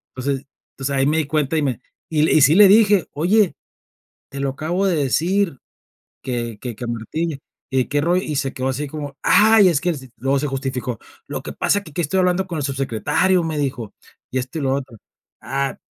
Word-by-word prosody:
entonces, 135 +1 -2 0.3
pues, 135 0 -3
ahí 135 -1 +2
me 155 +2 +2
di 160 - +1
cuenta 155 +1 0
y - - +2
me 130 -6 -2 0.3
y 155 -2 +1
le 155 - +3
y 155 - +5
sí 140 +3 +6
le 205 +1 +9
dije: 205 -4 +5
"Oye, 185 +6 +2 0.8
te 140 - -6
lo 140 - 0
acabo 170 +8 -1
de 180 - +1
decir 165 +3 +1 0.6
que 120 -3 -3
que 120 -3 -5
que 120 +3 -6
Martín, 140 +8 -3 0.3
y 130 -1 +2
que 145 - -1
ro" 170 +4 +2
y 155 -5 -2
se 135 -1 -2
quedó 130 +1 -2
así 140 +3 -3
como: 145 -1 -7
"Ay 215 +1 +6
es 155 -4 +1
que 180 - 0
s", 135 -5 -8
luego 135 +3 +1
se 150 - -1
justificó. 130 -4 -3 0.3
"Lo - - -5
que - - -6
pasa 205 - +1
es - - -14
que 160 - -11
aquí 145 - -6
estoy 190 +4 0
hablando 180 +1 +1
con 170 -3 -4
el - - -3
subsecretario", 135 +7 +1
me 160 -2 -3
dijo, 125 -7 -3 0.4
y 130 - -2
esto, 130 +5 -5
y - - -4
lo 135 -1 +1
otro. 135 -3 -6 0.5
"Ah, 135 +3 -2
145 Hz, 220 wpm, -21 LUFS, 130-170 Hz, 0.8 s, le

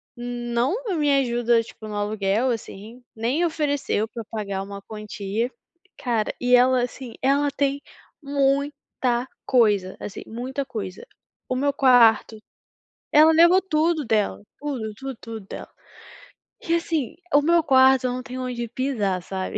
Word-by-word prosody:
não 240 - -2
me 295 -1 +1
ajuda, 240 -2 +2
tipo, 220 -1 -11
no 210 - -6
aluguel 205 +3 0
assim, 225 +2 -7
nem 255 +10 0
ofereceu 290 -8 -1
pra 230 -1 -7
pagar 200 -3 -3
uma 200 0 -8
quantia. 215 +2 -4 0.5
Cara, 230 -5 -1
e 250 0 +4
ela 255 0 +4
assim, 245 -1 -6
ela 280 +2 +2
tem 280 0 -1 0.4
muita 275 -3 0 0.2
coisa. 210 -7 +2
Assim, 200 - -7
muita 260 +4 -4
coisa. 205 -7 -6 0.4
O 255 - 0
meu 285 +1 +1
quarto 235 -5 +5 0.8
Ela 310 +2 +7
levou 345 +4 +6
tudo 320 -3 +1
dela, 215 -4 0 0.2
tudo, 260 -7 -4
tudo, 270 0 -6
tudo 225 -1 -7
dela. - - -8 1.0
E 335 - 0
assim, 325 -7 -2 0.2
o 290 - +6
meu 335 +3 +4
quarto, 260 -2 +5
eu 245 - -2
não 255 - -5
tenho 255 +1 -6
onde 240 -1 -3
pisar, 225 -8 -1
sabe, 190 +1 -4
245 Hz, 140 wpm, -23 LUFS, 220-280 Hz, 1.0 s, Ela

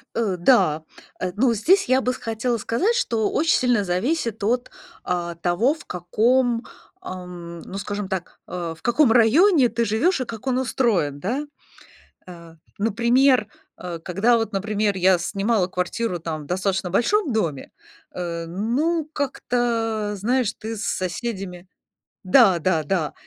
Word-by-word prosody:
Э, 215 -5 0
да, 170 - +3 0.4
э, 185 -1 -2
ну, 240 +2 +3
здесь 365 - +3
я 260 +1 +3
бы 250 -1 0
с - - -6
хотела 230 +2 -2
сказать, 335 - 0
что 225 - 0
очень 325 +2 +2
сильно 245 -5 +2
зависит 225 - -1
от, 245 +4 0 0.3
а, 175 -1 -2
того, 175 - +1
в 320 - -14
каком, 230 +7 +1 0.4
ам, 180 - -8
ну, 195 - -7
скажем 205 0 -4
так, 190 -2 -5
э, 170 -2 -4
в - - -22
каком 240 +1 +3
районе 265 - +5
ты 235 +1 -1
живёшь 245 - +1
и - - 0
как 230 +1 -9
он 255 -1 +1
устроен, 215 - 0
да? 255 - -2 0.8
Э, 170 -2 -12 0.2
например, 235 +3 +3 0.3
э, 175 -2 -5
когда 195 +8 +2
вот, 225 -1 -2
например, 205 0 0
я 185 0 +4
снимала 195 +3 0
квартиру 180 +2 -2
там 160 -2 -5
в - - -12
достаточно 185 +2 -1
большом 285 - +1
доме, 165 -11 -2 0.4
э, 170 -2 -4
ну, 270 - -1
как-то, 230 -6 -1
знаешь, 235 +3 0
ты 225 +1 -5
с 210 - -5
соседями 185 -3 -4 0.6
да-да-да, 185 - +3
215 Hz, 145 wpm, -23 LUFS, 180-245 Hz, 0.8 s, районе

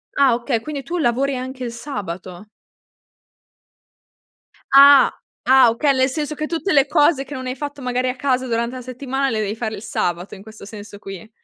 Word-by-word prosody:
Ah 275 -3 +4
okay, 240 0 -1
quindi 285 0 -6
tu 340 +7 -4
lavori 270 +1 0
anche 255 0 -6
il 235 - -4
sabato? 200 - -7 2.3
Ah, 280 -1 +8 0.3
ah 260 -1 +6
okay. 275 +5 +1
Nel 260 0 +2
senso 300 +2 -4
che 305 - -3
tutte 335 +2 -2
le 275 -1 +5
cose 290 -2 +3
che 290 - -10
non 260 -2 -6
hai 255 - -3
fatto 285 +1 -7
magari 250 0 -1
a 250 - -3
casa 260 -1 0
durante 235 +1 -2
la 255 - -7
settimana 265 +2 -3
le 220 - -2
devi 210 0 -2
fare 220 -1 -4
il 200 - -10
sabato, 180 -3 -3
in 190 - -13
questo 220 -1 -13
senso 205 0 -11
qui. 195 +2 -10
255 Hz, 190 wpm, -20 LUFS, 225-275 Hz, 2.3 s, Ah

